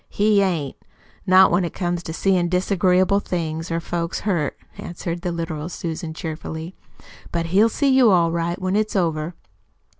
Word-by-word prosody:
"He 205 0 +3
ain't 170 -8 -1 0.5
not 185 +1 +7
when 175 +2 +2
it 170 - -4
comes 175 -2 -2
to 165 - -7
seein' 180 0 +1
disagreeable 185 +1 +2
things, 165 -4 -3
or 165 0 -1
folks 170 0 -3
hurt," 170 -9 -1 0.2
answered 170 0 -5
the 175 - -2
literal 165 -2 -4
Susan 165 -1 -5
cheerfully. 160 +1 -6 0.6
"But 170 -1 -1
he'll 215 +4 +5
see 280 +5 +1
you 260 -3 +5
all 170 -4 +3
right, 170 +2 -2
when 185 0 -1
it's 215 0 0
over." 165 -2 -1
175 Hz, 160 wpm, -22 LUFS, 165-190 Hz, 0.6 s, not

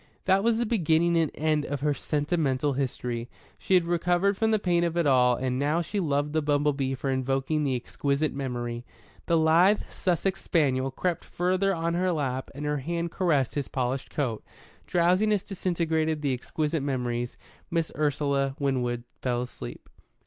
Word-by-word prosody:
That 195 +1 +3
was 230 0 +3
the 240 - +1
beginning 170 -6 +2
and 165 -2 +3
end 155 -1 +1
of 145 -1 -4
her 150 0 +2
sentimental 145 -1 0
history. 125 -3 -3 0.3
She 190 - +2
had 180 -2 +4
recovered 175 +3 +2
from 220 +2 +1
the 220 - +3
pain 175 -4 +1
of 170 0 -1
it 170 - +2
all 125 -3 +4
and 130 +1 -2
now 150 +4 +1
she 205 +5 -3
loved 145 -3 0
the 160 - +2
bumble 145 0 +2
bee 135 -1 -1
for 135 +1 -2
invoking 135 +3 0
the 135 -3 +1
exquisite 140 +4 -1
memory. 120 -3 -4 0.4
The 170 - +3
lithe 170 +6 +4
Sussex 190 +1 -1
spaniel 135 -5 +1
crept 170 +6 -2
farther 185 +2 0
on 165 0 -1
her 180 +1 +1
lap 135 -5 -2
and 145 +1 -5
her 150 0 0
hand 170 +4 -3
caressed 155 -10 +1
his 145 -3 -2
polished 130 +1 -2
coat. 125 -7 -2 0.4
Drowsiness 185 +4 +2
disintegrated 160 -5 -1
the 140 -2 +1
exquisite 150 +4 -2
memories. 125 -3 -2 0.3
Miss 165 -2 -1
Ursula 140 -2 0
Winwood 125 -4 -1 0.2
fell 125 -1 0
asleep. - - -9
150 Hz, 170 wpm, -27 LUFS, 135-170 Hz, 0.4 s, had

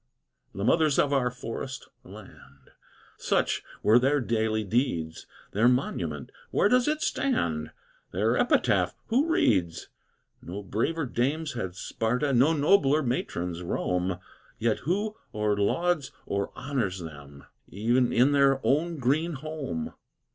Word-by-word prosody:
The 100 - -3
Mothers 155 +4 +3
of 145 -1 +3
our 130 -3 +2
Forest 125 +2 -6 0.2
Land! 70 0 -15 0.5
Such - - +1 0.2
were 110 +3 +6
their 135 +3 +2
daily 110 -3 0
deeds. 100 - -1 0.2
Their 110 +4 +3
monument! 85 - -1 0.2
where - - +3
does 250 +4 +3
it 310 +1 0
stand? 80 - 0 0.4
Their 110 +6 +1
epitaph! 245 - +2
who 265 +7 +2
reads? 95 - +1 0.5
No 100 +4 -7
braver 140 - -1
dames 140 +5 -1
had 95 -7 -4
Sparta, 125 +8 -1
No 130 +6 +5
nobler 155 -1 +3
matrons 90 -8 -2
Rome, 90 +1 -1 0.4
Yet 115 -1 0
who 205 - -2 0.2
or 105 -1 +1
lauds 150 +8 0
or 100 0 -2
honors 125 -9 -2
them, 70 -5 -10 0.3
E'en 120 +5 +1
in 130 +4 +4
their 140 -1 +4
own 160 +4 +1
green 150 +6 +1
home! 140 - -5
125 Hz, 125 wpm, -27 LUFS, 100-150 Hz, 0.5 s, were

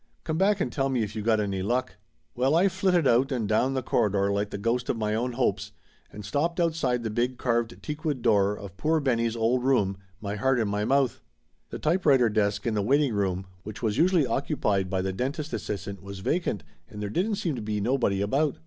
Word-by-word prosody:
Come 160 0 -2
back 200 +1 +3
and 125 - -1
tell 135 +2 0
me 125 -4 +1
if 105 0 -6
you 110 - -3
got 110 0 +2
any 100 -2 -1
luck 125 +6 -1 0.2
!" 80 -1 -45
Well, 130 +5 +2
I 185 +4 +4
flitted 185 -3 +1
out 130 +4 +3
and 120 -5 -1
down 125 +6 +1
the 130 - -1
corridor 100 -4 +1
like 100 +1 -1
the - - -5
ghost 120 +4 -1
of - - 0
my 105 -1 -1
own 120 +3 -1
hopes, 125 +1 -1 0.4
and 105 -1 -9
stopped 165 - -1
outside 155 -8 +1
the 110 - -2
big 120 +3 -1
carved 120 -2 -1
teakwood 150 -4 -3
door 105 -2 +3
of 95 -2 -10
poor 160 +8 +1
Benny's 115 -5 0
old 120 +2 +1
room, 105 -8 +2 0.2
my 100 -1 -4
heart 130 +4 +2
in 110 - +1
my 105 +1 -1
mouth. 135 -1 +1 0.5
The - - -5
typewriter 150 -7 +3
desk 105 -1 0
in 115 - 0
the 105 - +1
wait 135 +9 +3
ing 135 -6 0
room, 95 -2 -1 0.2
which 105 +5 -9
was 110 0 0
usually 175 -2 +4
occupied 105 - 0
by 95 -1 -1
the 95 0 -2
dentist 145 - -3
assistant, 100 -3 -4
was 100 0 -8
vacant, 105 - -1 0.3
and 105 - -9
there 105 - -3
didn't 205 - 0
seem 170 -5 -2
to 120 - -5
be 105 0 -2
no 120 +6 +1
body 100 -5 +1
about. 135 +8 +1
120 Hz, 230 wpm, -27 LUFS, 105-140 Hz, 0.5 s, I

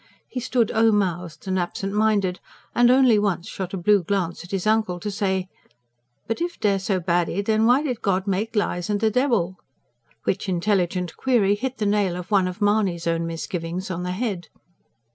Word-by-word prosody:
He 255 - -5
stood 245 -2 +1
o 225 0 +4
mouthed 180 -4 -2
and 190 0 0
absentminded, 195 +1 0 0.3
and 240 0 +5
only 250 -4 +5
once 200 -3 -1
shot 190 -4 -5
a - - -3
blue 200 +3 +3
glance 175 -2 -2
at 175 - -12
his 195 -1 -2
uncle 215 -5 +1
to 210 +3 -4
say: 190 -2 -1 0.8
"But 225 +7 -3
if 345 0 -3
dey're 200 -2 +2
so 190 0 0
baddy... 175 +2 0
den 220 +1 +2
why 255 +4 +4
did 250 -6 -3
God 190 -2 0
MAKE 205 +3 -2
lies 175 -4 -1
an' 205 - +1
de 220 +1 +1
debble?" 225 -8 +1 0.7
which 195 +1 -1
intelligent 180 -1 0
query 230 -7 +3
hit 255 +5 -3
the 215 - -1
nail 200 -3 +1
of 180 +3 -7
one 195 -3 +4
of 185 +3 -4
Mahony's 205 -5 +1
own 165 0 0
misgivings 165 +2 -4
on 180 -1 -3
the 180 0 -3
head. 195 -5 -3
195 Hz, 185 wpm, -23 LUFS, 180-220 Hz, 0.8 s, and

